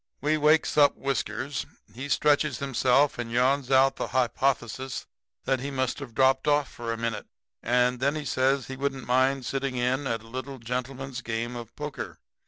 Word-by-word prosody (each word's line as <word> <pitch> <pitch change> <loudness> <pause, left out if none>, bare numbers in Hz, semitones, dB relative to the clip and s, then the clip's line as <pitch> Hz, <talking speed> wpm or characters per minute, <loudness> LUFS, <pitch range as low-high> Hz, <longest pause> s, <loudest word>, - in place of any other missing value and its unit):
"We 150 +3 +1
wakes 155 +1 +3
up 145 -1 +5
Whiskers. 135 0 -2 0.3
He 135 +5 -6
stretches 150 -2 +2
himself 135 0 +2
and 115 -1 -4
yawns 130 +2 +2
out 135 0 +4
the - - -2
hypothesis 130 0 -1 0.4
that 135 -1 +1
he 140 +2 -4
must 130 -2 -1
have 130 -5 -9
dropped 130 +1 +3
off 145 -1 +3
for 115 -1 -5
a 115 - -2
minute. 115 -2 -3 0.3
And 125 +1 +2
then 140 +3 +1
he 150 -1 -4
says 130 0 +1
he 135 - -6
wouldn't 135 -1 -2
mind 130 +1 +2
sitting 135 -1 -2
in 125 +3 0
at 115 -2 -2
a - - -14
little 130 +3 -6
gentleman's 130 +2 -4
game 115 +1 -3
of 120 -2 -8
poker. 120 - -6
130 Hz, 180 wpm, -27 LUFS, 125-140 Hz, 0.4 s, up